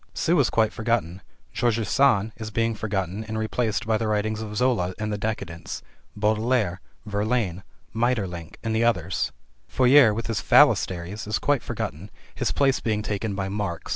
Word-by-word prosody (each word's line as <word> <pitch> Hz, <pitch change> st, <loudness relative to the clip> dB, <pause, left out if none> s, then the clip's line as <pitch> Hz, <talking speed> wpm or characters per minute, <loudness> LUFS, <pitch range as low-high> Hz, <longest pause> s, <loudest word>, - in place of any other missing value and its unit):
Sue 170 Hz, 0 st, +2 dB
is 135 Hz, -, +3 dB
quite 110 Hz, -1 st, +2 dB
forgotten, 110 Hz, -6 st, -1 dB, 0.3 s
Georges 115 Hz, -3 st, 0 dB
Sand 115 Hz, -4 st, +3 dB
is 110 Hz, -1 st, -5 dB
being 115 Hz, +1 st, 0 dB
forgotten 100 Hz, -2 st, -3 dB
and 110 Hz, 0 st, -4 dB
replaced 110 Hz, 0 st, -1 dB
by 110 Hz, -1 st, +1 dB
the 115 Hz, -, -1 dB
writings 110 Hz, +1 st, -1 dB
of 105 Hz, -1 st, -6 dB
Zola 105 Hz, -8 st, +1 dB
and 105 Hz, -1 st, -3 dB
the -, -, -2 dB
Decadents, 100 Hz, -6 st, -4 dB, 0.3 s
Beaudelaire, 110 Hz, -3 st, +1 dB, 0.2 s
Verlaine, 105 Hz, -3 st, -1 dB, 0.3 s
Maeterlinck, 105 Hz, -8 st, -1 dB
and 110 Hz, -1 st, -1 dB
others. 95 Hz, -6 st, 0 dB, 0.4 s
Fourier 130 Hz, -2 st, +6 dB
with 110 Hz, +2 st, -3 dB
his 115 Hz, -3 st, -2 dB
phalansteries 90 Hz, +4 st, +3 dB
is 110 Hz, -, 0 dB
quite 145 Hz, -3 st, +1 dB
forgotten, 85 Hz, +8 st, -5 dB, 0.2 s
his -, -, -1 dB
place 135 Hz, -2 st, +2 dB
being 105 Hz, -2 st, -1 dB
taken 105 Hz, -1 st, -2 dB
by 95 Hz, 0 st, -2 dB
Marx. 95 Hz, -4 st, -4 dB
110 Hz, 160 wpm, -25 LUFS, 100-115 Hz, 0.4 s, Fourier